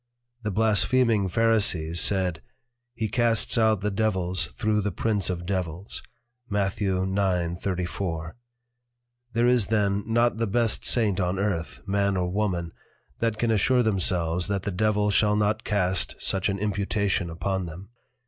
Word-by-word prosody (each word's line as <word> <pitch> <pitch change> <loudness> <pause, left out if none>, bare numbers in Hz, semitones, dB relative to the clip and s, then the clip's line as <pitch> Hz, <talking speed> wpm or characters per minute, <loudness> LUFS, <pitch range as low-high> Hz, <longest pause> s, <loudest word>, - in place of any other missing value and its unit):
The 105 - -3
Blaspheming 110 +1 +3
Pharisees 95 -6 +2
said, 90 -5 +1 0.5
he 110 - -2
casts 115 +1 +1
out 110 -4 +3
the 105 +1 -1
Devils 95 -6 0
thro' 105 0 0
the 105 0 -2
Prince 105 +1 -1
of 90 -1 -3
Devils, 90 0 -3 0.5
Matth. 100 0 -1
9.34. 90 -3 -1 1.0
There 115 +1 +2
is 125 -4 +3
then 100 -2 +1
not 120 +1 +2
the 115 0 0
best 115 +2 +1
Saint 105 -5 +3
on 90 0 0
Earth 95 -4 -2
(Man 100 0 0
or 90 -1 -1
Woman) 90 -4 -1 0.5
that 115 -2 0
can 115 +1 +1
assure 125 +4 +3
themselves 90 -5 +1
that 100 -2 -2
the 100 - -2
Devil 105 +2 +1
shall 105 +1 +3
not 105 +1 0
cast 95 -3 0
such 95 +1 0
an 100 - -1
Imputation 100 -2 -1
upon 95 +2 -3
them. 90 +5 -10
100 Hz, 140 wpm, -25 LUFS, 90-110 Hz, 1.0 s, Blaspheming